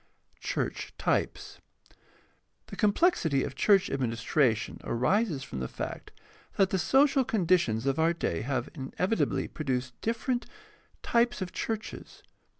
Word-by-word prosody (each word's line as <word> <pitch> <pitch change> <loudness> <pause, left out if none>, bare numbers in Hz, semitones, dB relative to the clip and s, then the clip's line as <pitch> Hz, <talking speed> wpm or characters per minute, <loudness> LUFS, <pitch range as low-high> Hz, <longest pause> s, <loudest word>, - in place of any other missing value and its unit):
2. - - -35
CHURCH - - -2
TYPES - - -1 1.0
The - - -9
complexity 205 - +2
of - - -4
church 195 +8 +4
administration 120 -2 0
arises 150 - +1
from 65 - -6
the 65 - -2
fact - - -6 0.4
that 195 -2 +3
the 190 - +1
social 270 +6 +4
conditions 170 - +1
of 135 +3 +1
our 165 +1 +4
day 160 - -2
have 130 0 -2
inevitably 175 +9 -1
pro 155 - -7
duced 125 -2 -2
different 240 +2 -1 0.6
types 235 0 +2
of 185 -2 -4
churches. 220 +2 -5
165 Hz, 130 wpm, -29 LUFS, 130-220 Hz, 1.0 s, church